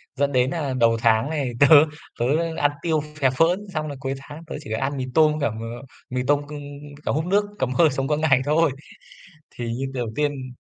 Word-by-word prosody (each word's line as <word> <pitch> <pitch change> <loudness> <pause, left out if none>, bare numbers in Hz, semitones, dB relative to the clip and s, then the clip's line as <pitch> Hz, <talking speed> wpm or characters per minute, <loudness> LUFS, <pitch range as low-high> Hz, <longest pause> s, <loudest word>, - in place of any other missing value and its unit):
dẫn 140 0 +1
đến 130 0 +2
nlà 145 -4 -2
đầu 115 -1 +4
tháng 115 +3 +3
này 145 -5 -2
tớ 140 - +7 0.5
tớ 120 - +1 0.3
ăn 145 0 +2
tiêu 160 -3 +1 0.2
phè 135 -3 +4
phỡn, 175 +10 +1
xong 155 -1 -2
rồi 140 -2 -6
cuối 135 0 -3
tháng 145 +4 -11
tớ 165 - -7
chỉ 110 - -9
ăn 135 +5 -1
mì 130 - -2
tôm 155 +1 +5
với 155 0 -4
cả 140 - +2
m - - -6 0.5
mì 125 0 -1
tôm 145 0 +3
c - - -17 0.6
cả - - +1
húp 155 +3 -1
nước, 200 +3 +2
cầm 130 -1 0
hơi, 160 +3 +5
sống 135 0 -2
qua 150 0 +1
ngày 140 -4 +3
thôi. 155 +1 +3 0.9
Thì 120 - -4
như 135 +3 -3
đầu 125 -3 -2
tiên 140 -4 -2
140 Hz, 225 wpm, -23 LUFS, 130-155 Hz, 0.9 s, tớ